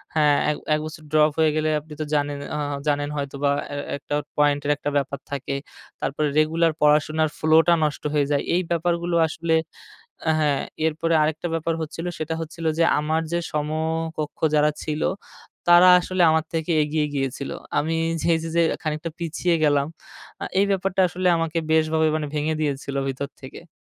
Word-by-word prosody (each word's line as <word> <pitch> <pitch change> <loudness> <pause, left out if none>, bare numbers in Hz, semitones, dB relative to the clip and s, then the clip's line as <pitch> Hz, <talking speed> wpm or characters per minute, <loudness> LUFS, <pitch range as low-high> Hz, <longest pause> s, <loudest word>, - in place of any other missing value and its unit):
হ্যাঁ, 150 -2 +4
এক, 150 - -3 0.2
এক - - -1
বছর 155 0 -8
ড্রপ 155 0 +4
হয়ে 160 -1 +4
গেলে 155 0 +1
আপনি 150 +1 -13
তো - - -1
জানেন 145 -1 0 0.2
অ - - -2 0.3
জানেন 145 0 +1
হয়তো 140 -1 -4
বা 140 - +4 0.2
এ - - -4 0.2
একটা 145 +1 -4 0.2
পয়েন্টের 145 0 +2
একটা 145 0 -3
ব্যাপার 140 0 -2
থাকে। 140 0 -3 0.5
তারপরে 145 +3 -1
রেগুলার 165 +1 +2
পড়াশোনার 155 +1 +3
flow 155 +1 +5
টা 175 - +6
নষ্ট 150 -1 -1
হয়ে 145 -1 +2
যায়। 140 - +1
এই 180 - +3
ব্যাপারগুলো 170 +1 0
আসলে 165 +1 -2 0.8
আ - - +5
হ্যাঁ, 145 -3 +1 0.3
এরপরে 165 +1 -1
আরেকটা 155 +2 -1
ব্যাপার 165 0 -1
হচ্ছিল 160 +2 -5
সেটা 155 +1 -2
হচ্ছিল 165 +1 -7
যে, - - +5 0.2
আমার 155 +2 0
যে, 170 - +1
সমকক্ষ 155 0 -2 0.2
যারা 150 0 +4
ছিল, 155 0 -3 0.7
তারা 175 +1 +8
আসলে 185 +1 -2
আমার 160 0 +1
থেকে 165 +1 -1
এগিয়ে 150 0 0
গিয়েছিল। 135 0 -3 0.3
আমি 160 +2 0 0.4
এই - - +3
যে, 165 - -4
যে, 170 - +4 0.2
খানিকটা 155 +1 -3
পিছিয়ে 170 +1 0
গেলাম। 145 -2 +3 0.6
আ - - -2
এই 200 - +4
ব্যাপারটা 195 -1 +1
আসলে 180 +2 -1
আমাকে 165 0 -2
বেশভাবে 160 0 +3
মানে 155 -1 -2
ভেঙে 150 +1 0
দিয়েছিল 140 -2 -2
ভিতর 135 +1 -3
থেকে। 135 +6 -11
155 Hz, 175 wpm, -23 LUFS, 145-165 Hz, 0.8 s, তারা